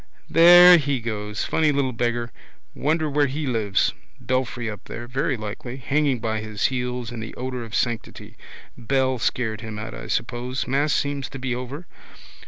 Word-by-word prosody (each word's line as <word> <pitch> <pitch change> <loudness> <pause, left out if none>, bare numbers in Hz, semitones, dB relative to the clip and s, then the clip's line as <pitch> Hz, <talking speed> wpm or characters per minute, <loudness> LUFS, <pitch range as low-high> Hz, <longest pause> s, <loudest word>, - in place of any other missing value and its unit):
There 175 +2 +9
he 140 -3 -1
goes. 105 -2 -4
Funny 155 -2 +2
little 140 -2 0
beggar. 120 0 -1 0.4
Wonder 155 +2 0
where 145 0 +2
he 145 +3 -3
lives. 110 -6 +1 0.3
Belfry 130 -2 -2
up 105 -2 -7
there. 120 - -7
Very 130 +1 -1
likely. 110 +4 -6
Hanging 140 +1 +1
by 110 -1 -2
his 105 -1 -3
heels 125 -1 -3
in 120 - -6
the 110 0 -7
odour 130 0 -4
of 110 -1 -7
sanctity. 120 -2 -3 0.4
Bell 130 +1 0
scared 110 -2 -1
him 110 -1 -7
out, 110 +1 -6
I - - -8
suppose. 120 +2 -2
Mass 140 +3 +1
seems 140 -2 -1
to 135 - -8
be 130 -1 -2
over. 130 +7 -6
125 Hz, 170 wpm, -23 LUFS, 115-140 Hz, 0.4 s, There